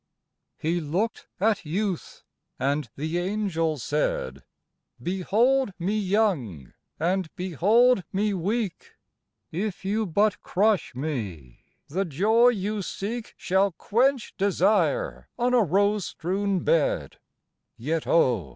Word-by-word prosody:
He 170 Hz, +3 st, 0 dB
looked 180 Hz, +10 st, -2 dB
at 210 Hz, +1 st, +2 dB
Youth, 185 Hz, +3 st, -3 dB, 0.3 s
and 140 Hz, 0 st, -1 dB
the 160 Hz, +4 st, -2 dB
Angel 175 Hz, -5 st, -1 dB
said: 115 Hz, -, -2 dB, 0.6 s
"Behold 205 Hz, -, +1 dB
me 185 Hz, +5 st, -1 dB
young, 185 Hz, -, 0 dB, 0.3 s
and 180 Hz, +1 st, 0 dB
behold 200 Hz, -, +3 dB
me 205 Hz, +2 st, 0 dB
weak; 200 Hz, +2 st, -3 dB, 0.6 s
If 190 Hz, +3 st, -3 dB
you 210 Hz, +2 st, 0 dB
but 205 Hz, +5 st, +1 dB
crush 205 Hz, -, +1 dB
me, 105 Hz, -, -5 dB, 0.2 s
the 185 Hz, +7 st, -1 dB
joy 210 Hz, -, +4 dB
you 210 Hz, -2 st, 0 dB
seek 220 Hz, +5 st, -5 dB
Shall 190 Hz, 0 st, +1 dB
quench 250 Hz, -, +1 dB
desire 205 Hz, -, +1 dB
on 245 Hz, +1 st, +1 dB
a 245 Hz, -, +5 dB
rose 200 Hz, +2 st, +2 dB
strewn 190 Hz, +2 st, -1 dB
bed, 160 Hz, -3 st, +1 dB, 0.6 s
"Yet 155 Hz, +7 st, -2 dB
oh! 120 Hz, -, +3 dB
190 Hz, 110 wpm, -26 LUFS, 160-215 Hz, 0.6 s, a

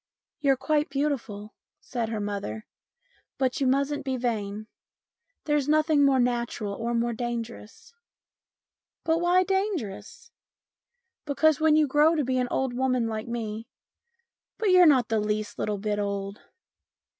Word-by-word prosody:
" -, -, -67 dB
You're 275 Hz, -3 st, +3 dB
quite 300 Hz, +3 st, 0 dB
beautiful," 255 Hz, -8 st, -3 dB, 0.3 s
said 235 Hz, -3 st, -4 dB
her 220 Hz, -1 st, -3 dB
mother, 200 Hz, -, -4 dB, 0.4 s
" -, -, -40 dB
but 265 Hz, +3 st, -1 dB
you 270 Hz, -, +2 dB
mustn't 280 Hz, +2 st, 0 dB
be 265 Hz, -1 st, -2 dB
vain. 215 Hz, -4 st, -3 dB, 0.8 s
There's 295 Hz, -2 st, +1 dB
nothing 310 Hz, -1 st, +3 dB
more 275 Hz, -2 st, +4 dB
natural 240 Hz, -4 st, -1 dB
or 235 Hz, +3 st, -3 dB
more 235 Hz, 0 st, 0 dB
dangerous." 235 Hz, -, -6 dB, 0.6 s
" -, -, -68 dB
But 330 Hz, +1 st, +2 dB
why 355 Hz, +1 st, +4 dB
dangerous? 380 Hz, -, -3 dB, 0.3 s
" -, -, -67 dB
" 470 Hz, -1 st, -57 dB
Because 300 Hz, 0 st, +3 dB
when 315 Hz, -1 st, +4 dB
you 310 Hz, -1 st, +4 dB
grow 295 Hz, +4 st, +3 dB
to 300 Hz, -, +1 dB
be 255 Hz, 0 st, 0 dB
an 250 Hz, -, 0 dB
old 265 Hz, -2 st, -1 dB
woman 255 Hz, -1 st, +1 dB
like 220 Hz, 0 st, -4 dB
me" 225 Hz, -1 st, -5 dB, 0.5 s
" 470 Hz, 0 st, -52 dB
But 425 Hz, -4 st, +1 dB
you're 365 Hz, -1 st, +7 dB
not 260 Hz, -6 st, +4 dB
the 225 Hz, -1 st, +1 dB
least 210 Hz, 0 st, -3 dB
little 210 Hz, -1 st, -1 dB
bit 205 Hz, +1 st, -2 dB
old." 200 Hz, 0 st, -3 dB
255 Hz, 160 wpm, -26 LUFS, 215-300 Hz, 0.8 s, you're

